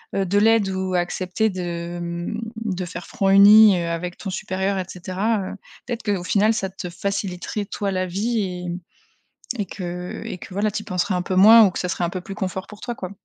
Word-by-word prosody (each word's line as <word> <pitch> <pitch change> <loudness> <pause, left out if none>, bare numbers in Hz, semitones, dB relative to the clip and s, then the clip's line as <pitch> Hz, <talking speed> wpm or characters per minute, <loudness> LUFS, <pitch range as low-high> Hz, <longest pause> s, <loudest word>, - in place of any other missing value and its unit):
heu 195 - +1
heu, - - 0
de 195 +3 +1
l'aide 220 -1 +4
ou 190 0 -2
accepter 180 +4 0
de, 175 -2 -4
mmh, 170 +5 -4 0.3
de 185 -3 -2
faire 175 +1 -8
front 200 -6 0
uni, 205 +1 +8
heu, 170 - -3
avec 170 +1 -4
ton 200 - -6
supérieur 190 0 -2
et 185 - -3
cetera, 190 +5 -2
heu, 190 - -5 0.3
peut-être 240 -1 -4
qu'au 200 -4 -1
final 210 +4 +3
ça 195 -4 -2
te 185 -1 -7
faciliterait 195 +2 -3
toi 200 0 -3
la 185 -1 -1
vie 210 +6 -1
et 180 -2 -4 0.9
et 205 -4 -2
que 180 -1 -6
et - - -6
que 185 - -11
voilà 205 +2 +1
tu 210 +1 -4
y - - -13
penserais 185 +2 -1
un 180 - 0
peu 185 - -3
moins 220 +4 +9
ou 195 - +4
que - - -6
ça 180 - -2
serait 180 - -3
un - - 0
peu 185 - -4
plus 195 - -7
confort 190 0 -4
pour 210 0 -13
toi 240 - -4
quoi. 185 -1 -6
190 Hz, 230 wpm, -22 LUFS, 180-205 Hz, 0.9 s, moins